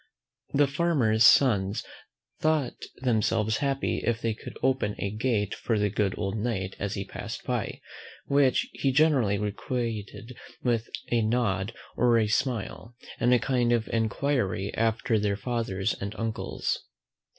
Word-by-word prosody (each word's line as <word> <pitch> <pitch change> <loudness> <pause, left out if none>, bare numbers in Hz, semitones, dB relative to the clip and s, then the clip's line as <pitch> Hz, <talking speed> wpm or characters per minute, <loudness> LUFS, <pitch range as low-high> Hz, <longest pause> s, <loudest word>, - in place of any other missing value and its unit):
The 145 +1 +4
farmers' 135 -7 +3
sons 105 -7 +4 0.6
thought 155 -5 0 0.2
themselves 110 -2 +1
happy 140 -1 0
if 115 -1 0
they 115 -1 -1
could 105 - -10
open 130 -6 +1
a 100 - -2
gate 105 -2 0
for 115 - -1
the 105 -1 +1
good 100 -2 0
old 95 0 -2
Knight 100 -4 -2
as 100 +1 -2
he 100 -1 -3
passed 110 +3 -7
by; 125 -4 -2 0.5
which 140 -2 +3
he 135 - 0
generally 130 -8 +3
requited 110 +2 -4 0.3
with 115 -2 0 0.2
a 120 -1 +3
nod 110 -2 0 0.2
or 120 -1 +4
a 110 - +3
smile, 115 0 -2 0.2
and 120 - +3
a 125 - +7
kind 120 0 +1
of 115 -2 +1
enquiry 115 -3 0
after 115 0 +1
their 100 -1 0
fathers 115 -4 -1
and 100 +2 -6
uncles. 115 -1 -2
115 Hz, 140 wpm, -27 LUFS, 105-125 Hz, 0.6 s, a